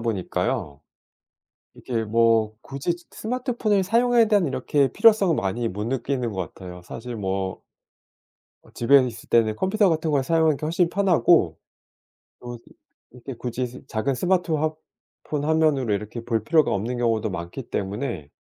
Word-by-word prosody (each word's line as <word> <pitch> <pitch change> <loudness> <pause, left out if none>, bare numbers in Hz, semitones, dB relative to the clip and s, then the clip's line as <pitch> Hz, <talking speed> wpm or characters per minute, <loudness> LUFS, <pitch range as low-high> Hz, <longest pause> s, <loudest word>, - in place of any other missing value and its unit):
보니까요. 95 - -2 1.0
이게 115 -3 -3
뭐 115 0 +2
굳이 140 +6 -3
즈 175 0 -19
스마트폰을 235 -4 -1
사용에 235 +3 +3
대한 205 -4 +3
이렇게 135 0 0
필요성을 210 -7 +4
많이 115 +5 -1
못 105 0 -4
느끼는 125 -2 -2
것 95 -5 -5
같아요. 90 -1 -10
사실 120 +5 -7
뭐 95 -2 -3 1.0
어 - - -20
집에 135 +3 +4
있을 115 -2 -9
때는 110 -2 +3
컴퓨터 200 +2 +2
같은 160 -1 0
걸 140 - +2
사용하는 160 +1 +2
게 - - -6
훨씬 170 +2 +1
편하고 175 - +3 0.8
또 120 -1 -8
이 - - -18 0.4
이렇게 125 +2 -9
굳이 125 +1 -3
즈 125 +2 -13
작은 125 +5 -1
스마트 180 +2 0
화 155 0 0 0.5
폰 145 -1 -2
화면으로 155 -6 +2
이렇게 105 +3 -6
볼 115 -2 -1
필요가 155 +4 +3
없는 115 +6 -2
경우도 110 -3 0
많기 85 +8 -6
때문에. 100 - -4
125 Hz, 320 characters per minute, -24 LUFS, 110-165 Hz, 1.0 s, 필요성을